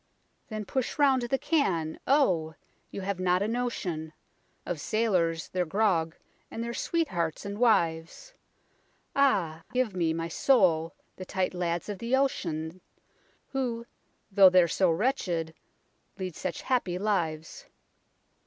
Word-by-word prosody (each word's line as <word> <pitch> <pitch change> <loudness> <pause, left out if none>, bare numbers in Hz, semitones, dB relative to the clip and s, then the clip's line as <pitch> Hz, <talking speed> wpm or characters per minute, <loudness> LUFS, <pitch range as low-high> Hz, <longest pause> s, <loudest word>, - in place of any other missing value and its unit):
Then 215 -2 -5
push 255 +5 -2
round 275 -3 +4
the 240 +3 0
can 180 - 0
oh! 180 - +2 0.3
you 200 - -6
have 195 -1 -3
not 180 +1 +2
a - - 0
notion 185 -10 -3 0.5
Of 170 -4 -4
sailors, 180 -7 0
their 180 -1 0
grog, 170 -3 +1 0.3
and 230 - -5
their 235 0 -4
sweethearts 190 - -1
and 200 +1 -5
wives. 190 - +1 0.8
Ah 190 - +2
I - - -23
give 250 -6 0
me, 170 -3 +1
my 165 +1 -2
soul, 170 -6 +2 0.2
the 185 - -6
tight 185 0 -1
lads 175 -2 -2
of 205 -3 -5
the 235 +3 +1
ocean, 175 - -1 0.7
Who, 245 -4 -2 0.5
though 195 -1 +8
they're 180 -1 +5
so 185 +2 +2
wretched, 170 - 0 0.6
lead 185 -4 -5
such 180 -3 -4
happy 215 -9 0
lives. 185 - -2
185 Hz, 135 wpm, -28 LUFS, 165-235 Hz, 0.8 s, though